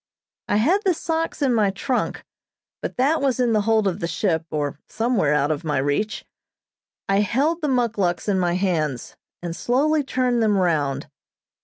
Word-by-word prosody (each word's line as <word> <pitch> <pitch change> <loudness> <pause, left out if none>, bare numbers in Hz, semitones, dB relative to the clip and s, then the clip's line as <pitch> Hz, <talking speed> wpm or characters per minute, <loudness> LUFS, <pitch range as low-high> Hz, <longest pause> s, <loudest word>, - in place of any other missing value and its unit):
I - - +1
had 320 - +3
the 375 -4 +2
socks 325 -1 -2
in 260 -3 +3
my 215 -3 +3
trunk, 245 +6 -2 0.6
but - - -5
that 280 +5 +2
was 265 -2 +1
in 240 -2 +2
the 215 - +3
hold 220 -1 +2
of 185 0 -1
the 170 - -2
ship, 165 -1 -1
or 145 -2 -3
somewhere 225 - +1
out 145 +1 +1
of 155 +1 -3
my 150 -3 -1
reach. 145 +11 -1 0.8
I 195 0 +2
held 280 - +1
the 300 - 0
muckluks 225 -10 0
in 195 -2 +2
my 175 -1 +1
hands, 160 -9 -1 0.3
and 170 -1 -4
slowly 290 - +1
turned 250 -3 0
them 210 -2 +3
round. 155 -7 0
210 Hz, 175 wpm, -23 LUFS, 170-255 Hz, 0.8 s, had